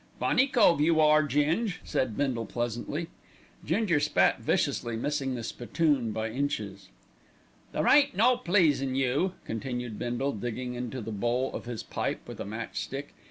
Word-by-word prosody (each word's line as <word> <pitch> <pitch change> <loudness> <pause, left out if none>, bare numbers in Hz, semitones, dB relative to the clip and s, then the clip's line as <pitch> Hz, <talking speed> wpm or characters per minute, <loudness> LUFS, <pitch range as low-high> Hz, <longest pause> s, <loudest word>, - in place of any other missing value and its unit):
"Funny 260 +2 +3
cove 210 - +4
you 160 +1 +3
are, 155 0 +6
Ging," 155 - +1
said 115 -5 -1
Bindle 125 -6 -1
pleasantly. 120 +8 -3 0.5
Ginger 170 -1 +1
spat 150 +1 +3
viciously, 120 -1 0
missing 135 +2 -1
the 120 - -5
spittoon 125 0 0
by 110 +1 -3
inches. 110 -7 -3 0.8
"There - - -1
ain't 285 -1 +5
no 245 +5 +5
pleasin' 160 - +2
you," 135 +8 +1
continued 120 -1 -4
Bindle, 120 +3 -1
digging 120 +3 -4
into 125 +1 -4
the 110 - -6
bowl 120 +5 -1
of - - -6
his 120 -2 -5
pipe - - -3
with - - -9
a - - -4
match 110 +3 -5
stick. 140 +2 -6
135 Hz, 155 wpm, -28 LUFS, 120-155 Hz, 0.8 s, are